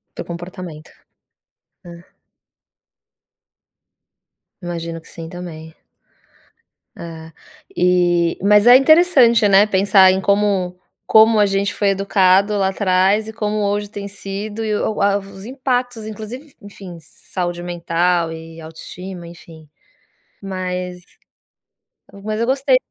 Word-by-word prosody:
Teu - - -6
comportamento. 175 -2 -9 0.9
Ah. 170 0 -15 2.5
Imagino 170 -1 -5
que - - -20
sim 165 -1 -9
também. 165 -2 -9 1.2
É, 160 -1 -10 0.4
e 175 -1 +2
mas 210 +2 +4
é 245 - +10
interessante, 265 - +5
né, 200 +1 +5
pensar 190 -1 +4
em 190 - -1
como 195 -3 0 0.3
como 220 0 +5
a - - +5
gente 195 +1 -1
foi 205 - 0
educado 195 +1 +2
lá 195 -1 +1
atrás 190 +2 +1
e 220 - -7
como 210 -1 -3
hoje 205 0 -1
tem 205 -1 -7
sido 205 +2 -6
e 215 -1 -1
o 215 0 -2
a 200 0 +2
os 195 -1 -12
impactos 245 -2 -3
inclusive 220 +5 -8 0.2
en - - -12
enfim, 195 -3 -11
saúde 175 +2 -6
mental 175 -1 -1
e 165 0 -10
autoestima, 175 +3 -9
enfim. 165 -2 -14 0.7
Mas 180 -2 -5 1.2
mas 215 0 -3
eu 230 - +1
gostei 270 0 +2
195 Hz, 120 wpm, -19 LUFS, 175-210 Hz, 2.5 s, é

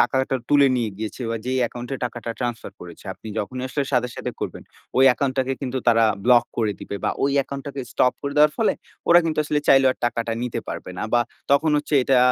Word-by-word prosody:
টাকাটা 130 0 +2
তুলে 145 -1 +6
নিয়ে 115 -3 -1
গিয়েছে, 110 +4 -5
বা 115 - -1
যে 130 - -1
অ্যাকাউন্ট 120 +1 -4
এ - - -3
টাকাটা 120 -1 -5
ট্রান্সফার 120 -2 -4
করেছে, 85 -2 -11
আপনি 110 - -11
যখনই 125 +5 -4
আসলে 140 +2 -1
সাথে, 125 -1 +2
সাথে - - -4
করবেন - - -5 0.3
ওই 130 - +6
অ্যাকাউন্ট 130 +1 +1
টাকে 130 0 +1
কিন্তু 130 -1 -2
তারা 115 -1 +5 0.2
ব্লক 120 -1 +6
করে 110 -3 +1
দিবে, 100 - -5
বা - - +2
ওই 140 - +2
অ্যাকাউন্ট 140 0 -2
টাকে 140 -1 -5
স্টপ 125 - +3
করে 140 0 -3
দেওয়ার 150 0 +6
ফলে 225 - +3 0.4
ওরা 170 - +8
কিন্তু 155 -2 -2
আসলে 150 0 0
চাইলেও 135 -1 +6
আর - - -24
টাকাটা 115 -1 -2
নিতে 125 -1 -3
পারবে - - -6
না, - - -3
বা 120 - +5 0.3
তখন 140 +3 +4
হচ্ছে 150 +1 -1
এটা 130 0 +3
130 Hz, 225 wpm, -23 LUFS, 120-140 Hz, 0.4 s, ওরা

